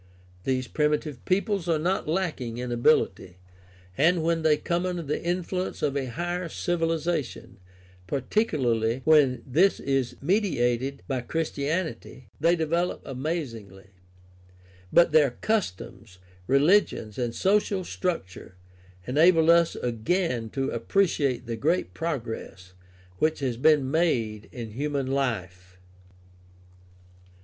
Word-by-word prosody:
These 130 -1 0
primitive 150 -2 -1
peoples 195 -1 0
are 165 - +3
not 180 +4 -1
lacking 155 -9 -2
in 125 0 -4
ability, 120 -6 +1 0.6
and 170 - +3
when 165 0 +1
they 155 -1 +3
come 170 +3 -1
under 180 -2 -2
the 150 0 -3
influence 180 +1 -2
of 145 -2 0
a 135 -2 -1
higher 175 +5 -3
civilization, 165 - -2 0.5
particularly 125 - 0
when 145 -5 +4
this 170 +10 +3
is 135 -3 -1
mediated 140 - 0
by 130 -3 -1
Christianity, 155 -1 -3
they 165 +3 +4
develop 170 +2 -1
amazingly; 120 - -5 1.0
but 170 -2 +5
their 150 -2 +5
customs, 110 - -3 0.3
reli 150 +10 +6
gions, 110 - -9
and 120 -2 -2
social 200 -1 +1
structure 165 - -4 0.5
enable 160 +4 +5
us 170 -1 +4
again 125 - -1
to 135 +3 -2
appreciate 140 - 0
the 115 0 -3
great 160 +10 0
progress 115 - -5 0.5
which 155 0 +2
has 130 -4 -1
been 135 +1 +3
made 120 -10 0
in 115 -3 -7
human 140 +3 -2
life. 95 -9 -3
150 Hz, 115 wpm, -26 LUFS, 120-170 Hz, 1.0 s, reli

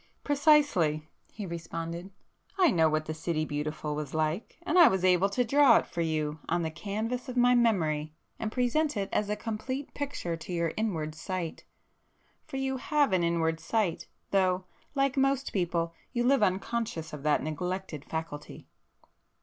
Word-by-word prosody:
"Precisely!" 280 - +3 0.2
he 210 - -6
responded—"I 170 - -3
know 160 -5 +4
what 155 0 0
the 155 - -3
'City 160 0 -1
Beautiful' 150 0 -3
was 150 0 -4
like, 155 +6 -1
and 360 +1 +3
I 340 - +10
was 190 -1 +1
able 185 +1 +4
to 245 +5 +1
draw 280 +2 +6
it - - 0
for 170 - -4
you 155 -2 -1
on 175 - +1
the 160 - -2
canvas 215 - -3
of 255 - -5
my 245 0 +5
memory 160 -11 +1 0.2
and 215 - -2
present 255 +4 +1
it 195 -1 -2
as 210 - +1
a 210 - +1
complete 235 +6 -4
picture 275 -12 -3
to 165 - -9
your 170 -2 0
inward 165 -9 -2
sight. 170 +1 -5 0.8
For 270 - -5
you 265 0 -1
have 285 -4 +1
an 180 -2 +3
inward 165 -1 +1
sight,—though 185 0 -1 0.3
like 275 0 +1
most 275 0 +1
people, 170 -3 0 0.2
you 240 - +1
live 265 0 +4
unconscious 195 -4 -1
of 150 - -6
that 150 0 +2
neglected 175 0 -4
faculty." 160 -2 -6
185 Hz, 160 wpm, -29 LUFS, 160-245 Hz, 0.8 s, I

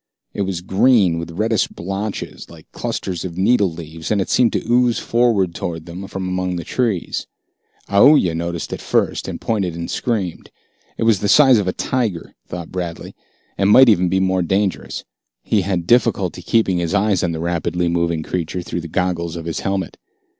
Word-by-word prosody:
It - - -3
was 95 -3 -2
green, 95 -2 +3
with 85 0 -6
reddish 110 0 +1
blotches 100 +4 -5
like - - -14
clusters 90 -3 -4
of 90 -2 -6
needle 100 -1 +3
leaves, 80 0 -8
and 105 - +1
it 95 - -2
seemed 125 -3 +4
to - - -2
ooze 120 0 +3
forward 115 -7 +1
toward 80 -1 -5
them 90 +3 -8
from 95 -2 -5
among 90 0 -2
the 85 - -4
trees. 110 -2 -2 0.6
Aoooya 100 - +5
noticed 85 0 -4
it - - -6
first, - - 0
and - - -5
pointed 95 -7 -1
and 85 0 -5
screamed. 100 -8 -2 0.5
It - - -1
was 115 -4 +3
the 100 - -1
size 135 -4 +6
of 100 - -2
a - - +2
tiger, 110 -9 -2
thought 85 -2 -7
Bradley, 90 -2 -5 0.5
and 100 0 +3
might 130 +5 +8
be 120 - +6
even 95 -1 +2
more 95 0 +1
dangerous. 95 +2 -1 0.4
He 105 - +1
had 90 -2 -2
difficulty 105 -6 +2
keeping 95 -1 +1
his 85 +3 -1
eyes 100 -2 +2
on 85 - 0
the 80 - -4
rapidly 85 +1 -1
moving 85 -1 0
creature 90 +1 -3
through 85 - -4
the 85 - -7
goggles 85 -1 -2
of 85 -1 -6
his 85 - -3
helmet. 95 -3 -3
95 Hz, 185 wpm, -19 LUFS, 85-105 Hz, 0.6 s, might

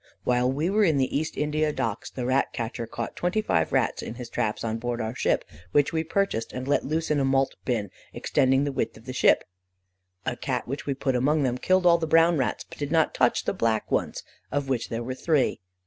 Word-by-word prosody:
While 125 +1 +2
we 150 +5 -1
were 210 +3 +3
in 160 -7 +3
the 130 -1 0
East 155 +2 -2
India 150 +1 +1
Docks, 115 -7 -3
the 125 - -5
rat 130 +2 +1
catcher 115 0 -4
caught 115 +1 -5
twenty 180 +5 0
five 80 - +1
rats - - +1
in 115 - -6
his 120 -1 -8
traps 110 -3 -1
on 115 0 -2
board 120 0 -3
our 110 0 -2
ship, - - 0 0.3
which 145 +1 +3
we 160 0 +1
purchased 165 - -1
and 130 +1 -5
let 145 - +2
loose 160 +2 -1
in 150 - +2
a - - +2
malt 135 0 +2
bin 110 -6 -1 0.2
extending 135 +1 +2
the 145 - -1
width 135 - -2
of 110 - -16
the 130 - -5
ship. - - +4 0.8
A - - -1
Cat - - -3
which 140 +4 -5
we 140 - 0
put 130 -1 -1
among 145 +4 +2
them 125 -1 0
killed 185 +4 +2
all 170 -1 +6
the 160 - -2
brown 165 0 +4
rats, 130 - -1
but - - -13
did 145 -1 -3
not 160 -1 +3
touch - - +2
the - - 0
black 110 -1 0
ones, - - -1 0.3
of 145 -1 -1
which 125 -4 -1
there 115 +1 -3
were 130 +2 -3
three. 145 0 +1
135 Hz, 235 wpm, -26 LUFS, 120-155 Hz, 0.8 s, all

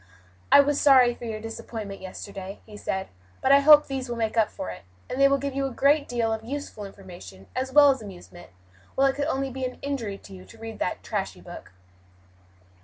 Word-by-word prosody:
"I 285 - +9
was 285 0 0
sorry 255 -4 +6
for 240 - -10
your 220 -2 -4
disappointment 220 -2 -7
yesterday," 195 +1 -8
he 215 - -13
said, 190 -2 -4 0.3
"but 265 - +2
I 280 - +8
hope 300 +1 +8
these 265 -2 -5
will 240 - -3
make 225 -1 -2
up 220 -2 +3
for 95 - -6
it, 90 - -10 0.3
and 260 - -3
they 275 - +8
will 275 0 +3
give 280 0 -4
you 275 0 -1
a - - -6
great 285 +4 +2
deal 230 -2 0
of 220 0 -5
useful 255 -4 -6
information, 175 - -12
as 260 +1 -2
well 290 0 +7
as 265 -3 -3
amusement; 175 -3 -12 0.5
while 270 - +3
it 270 - +2
could 285 0 -1
only 270 -3 -1
be 265 +1 -6
an 255 0 -4
injury 245 -8 -3
to 200 - -14
you 185 -1 -11
to 225 - -16
read 225 0 -8
that - - -2
trashy - - -4
book." - - -11
240 Hz, 220 wpm, -25 LUFS, 205-275 Hz, 0.5 s, I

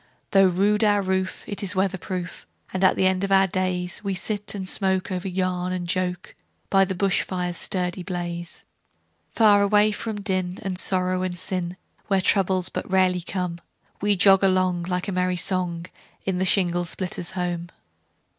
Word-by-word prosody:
Though 195 -2 +6
rude 205 +4 +2
our 205 -1 +3
roof, 190 0 -2
it 205 - -4
is 200 -1 -1
weather 190 0 0
proof, 180 +1 -6 0.3
And 185 0 -1
at 190 - +5
the 190 - +1
end 185 0 +2
of - - +1
the 195 - +5 0.2
daysWe 185 +1 -1
sit 205 +2 -1
and 190 -2 -5
smoke 190 -1 0
over 185 +1 -3
yarn 185 -1 -1
and 180 -1 -3
joke, 180 0 -2 0.4
By 195 -1 +5
the 190 - -4
bush 195 +1 +2
fire's 180 -2 -3
sturdy 180 -1 -1
blaze. 175 -2 -5 0.7
For 210 -3 +5
away 210 +1 +4
from 215 0 -4
din, 185 -2 -2
and 185 -2 -1
sorrow 185 -1 +1
and 185 -1 -3
sin, 180 0 -3 0.3
Where 195 -2 +2
troubles 185 -1 +2
but - - -5
rarely 185 -1 +2
come, 180 -1 -4 0.4
We 205 0 +2
jog 195 +1 +5
along, 185 -2 +2
like 180 +1 -2
a - - -2
merry 180 0 0
song, 175 -2 -1 0.4
In 190 -2 -1
the 190 - +1
shingle 175 -2 +2
splitter's 180 0 -3
home. 175 -1 -2
185 Hz, 175 wpm, -24 LUFS, 180-195 Hz, 0.7 s, Though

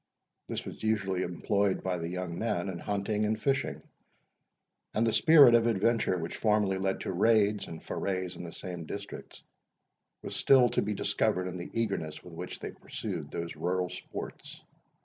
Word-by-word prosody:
This - - -4
was - - -8
usually 100 -4 0
employed 100 +2 0
by 90 -2 -1
the 85 0 -3
young 90 -1 -4
men 105 -5 -1
in 90 -2 -5
hunting 105 +2 -1
and 110 +1 0
fishing; 135 +3 0 1.1
and 110 +2 +3
the 115 - +2
spirit 150 -6 +8
of 115 0 +5
adventure, 115 -2 +2
which 85 -1 -4
formerly 105 -3 +2
led 95 0 -1
to - - -3
raids 105 +1 +3
and 80 -1 -8
forays 95 -2 -2
in 85 - -7
the 85 - -7
same 90 -4 -6
districts, 100 0 -8 0.8
was - - -4
still 130 -3 +5
to - - +1
be 105 0 -2
discovered 90 -1 +1
in 90 0 -5
the 85 - -6
eagerness 100 -9 -2
with 90 - -12
which 90 +2 -6
they - - -5
pursued - - -6
those 85 0 -5
rural 90 +1 -1
sports. - - -8
95 Hz, 170 wpm, -30 LUFS, 90-110 Hz, 1.1 s, spirit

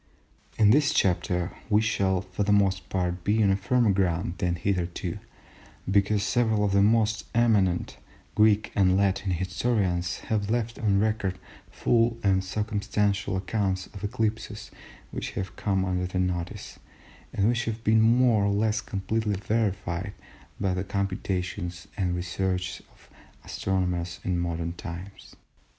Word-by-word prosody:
In 105 -2 +6
this 145 +4 +3
chapter 90 -1 +1 0.2
we 105 -1 +5
shall, 95 -4 +1
for 95 +1 -6
the 100 0 +2
most 95 -2 +2
part, 90 -1 -2
be 110 +1 +2
on 95 -1 +4
firmer 115 +3 +2
ground 90 -3 0
than 90 -2 0
hitherto, 90 -1 -2 0.7
because 100 +1 +2
several 110 -2 +2
of 100 - 0
the 100 0 +4
most 110 +1 +2
eminent 105 -7 +2 0.4
Greek 105 0 +3
and 95 -1 +3
Latin 100 0 +1
historians 90 0 -1
have 105 -2 0
left 115 0 -1
on 100 -3 +2
record 105 -3 0 0.3
full 115 0 +2
and 95 -2 +3
circumstantial 100 -1 -1
accounts 95 -1 -1
of 100 -1 -9
eclipses 110 0 -3 0.4
which - - -5
have 95 - -5
come 95 -2 0
under 90 -1 -1
their 95 +1 -3
notice, 90 +2 -4 0.5
and 100 - +1
which 120 +1 +1
have 115 0 -4
been 110 +1 +4
more 115 -2 +4
or 100 - +2
less 105 +2 +1
completely 105 +1 -2
verified 100 -2 -2 0.5
by 95 -2 0
the 90 +1 -2
computations 95 -2 -3
and 90 -3 0
researches 90 +1 -2
of - - -23 0.4
astronomers 90 -3 -2
in 90 -2 0
modern 85 -1 -2
times. 90 +3 -9
100 Hz, 140 wpm, -27 LUFS, 90-110 Hz, 0.7 s, In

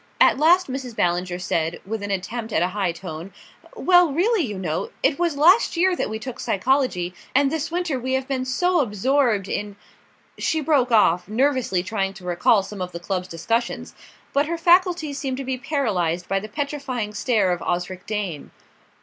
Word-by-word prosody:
At - - +5
last 350 +4 +5
Mrs. 255 -3 -6
Ballinger 175 0 0
said, 165 -2 -1
with 220 +2 -4
an 205 - -4
attempt 215 +4 -3
at 170 - +2
a 180 - +1
high 190 -2 -1
tone: 170 +1 -8 0.4
"Well, 355 -3 +4
really, 375 - +2
you 210 -7 -4
know, 165 -4 -3
it 285 - +2
was 340 -4 0
last 355 +6 +5
year 365 +1 +3
that - - -2
we 220 - -3
took 250 +2 -7
psychology, 200 -5 0 0.2
and 280 0 +4
this 320 -2 -2
winter 340 -5 -1
we 260 +2 -3
have 265 0 -1
been 265 -2 -1
so 355 +8 +1
absorbed 235 -3 +1
in 205 0 -4 0.3
" - - -34 0.3
She 320 - 0
broke 280 -5 +2
off, 180 -6 +4
nervously 245 -5 +1
trying 195 -1 -2
to 190 -3 -12
recall 180 +4 +3
some 195 0 -8
of 180 0 -4
the 170 - -5
club's 180 +1 -3
discussions; 230 +9 -2 0.4
but 285 +1 +2
her 335 +1 -2
faculties 340 -4 +3
seemed 265 -3 -3
to 270 - -5
be 260 -1 -3
paralysed 190 - -1
by 195 - +1
the 215 +2 -8
petrifying 275 -5 -3
stare 210 -3 +1
of 175 - -2
Osric 180 +1 -3
Dane. 200 -9 -4
230 Hz, 190 wpm, -23 LUFS, 185-285 Hz, 0.4 s, At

